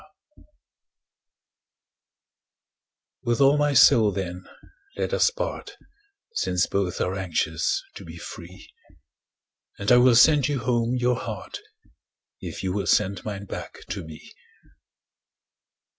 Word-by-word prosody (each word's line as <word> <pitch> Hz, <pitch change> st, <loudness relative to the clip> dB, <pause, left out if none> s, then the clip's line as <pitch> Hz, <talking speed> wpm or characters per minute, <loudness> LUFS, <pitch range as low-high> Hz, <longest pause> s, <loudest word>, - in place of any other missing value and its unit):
TO....... -, -, -23 dB, 2.8 s
With 120 Hz, -2 st, -1 dB
all 140 Hz, +1 st, +5 dB
my 145 Hz, -1 st, +1 dB
soul, 115 Hz, -4 st, +6 dB
then, 90 Hz, -2 st, -5 dB, 0.5 s
let -, -, -2 dB
us -, -, +4 dB
part, -, -, -6 dB, 0.6 s
Since 90 Hz, -, 0 dB
both 100 Hz, -2 st, -2 dB
are 90 Hz, -, -1 dB
anxious 80 Hz, -4 st, -1 dB
to -, -, -10 dB
be 80 Hz, 0 st, -10 dB
free; 85 Hz, +2 st, -11 dB, 1.1 s
And 100 Hz, -, -1 dB
I 125 Hz, -, +8 dB
will 125 Hz, -1 st, +5 dB
sand 145 Hz, +2 st, +5 dB
you 145 Hz, -2 st, -1 dB
home 120 Hz, 0 st, 0 dB
your 125 Hz, -1 st, +1 dB
heart, 110 Hz, -5 st, -7 dB, 0.8 s
If -, -, -7 dB
you 95 Hz, -1 st, -1 dB
will 100 Hz, -2 st, -2 dB
send 95 Hz, +3 st, +1 dB
mine 100 Hz, -2 st, -6 dB
back -, -, -8 dB
to -, -, -4 dB
me. 80 Hz, -1 st, -12 dB
105 Hz, 120 wpm, -24 LUFS, 90-125 Hz, 2.8 s, I